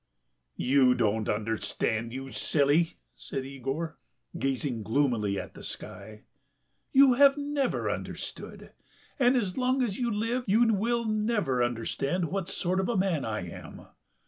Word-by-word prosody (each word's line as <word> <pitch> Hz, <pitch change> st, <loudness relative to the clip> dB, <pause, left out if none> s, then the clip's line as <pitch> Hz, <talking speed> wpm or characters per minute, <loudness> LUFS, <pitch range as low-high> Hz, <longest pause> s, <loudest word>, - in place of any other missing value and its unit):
"You 130 Hz, -1 st, +4 dB
don't 110 Hz, -2 st, 0 dB
understand, 110 Hz, +1 st, -1 dB
you 135 Hz, +1 st, -6 dB
silly," 150 Hz, +5 st, +2 dB, 0.2 s
said 135 Hz, -, -5 dB
Yegor, 135 Hz, +4 st, -4 dB, 0.4 s
gazing 135 Hz, -4 st, -1 dB
gloomily 110 Hz, -4 st, +1 dB
at -, -, -8 dB
the -, -, -11 dB
sky. 105 Hz, +1 st, -9 dB, 0.7 s
"You 270 Hz, -1 st, +7 dB
have 280 Hz, +2 st, +6 dB
never 285 Hz, -1 st, -1 dB
understood, -, -, -6 dB, 0.5 s
and 255 Hz, 0 st, +4 dB
as 205 Hz, -2 st, -1 dB
long 255 Hz, +1 st, +2 dB
as 210 Hz, -3 st, -2 dB
you 240 Hz, -1 st, 0 dB
live 230 Hz, +4 st, -1 dB
you 225 Hz, +3 st, +4 dB
will 235 Hz, +3 st, 0 dB
never 210 Hz, -, +1 dB
understand 135 Hz, +8 st, -1 dB
what 190 Hz, -2 st, -2 dB
sort 185 Hz, -1 st, -1 dB
of 195 Hz, +3 st, 0 dB
man 185 Hz, -7 st, +1 dB
I 105 Hz, -5 st, -3 dB
am.... -, -, -10 dB
165 Hz, 135 wpm, -28 LUFS, -, 0.7 s, You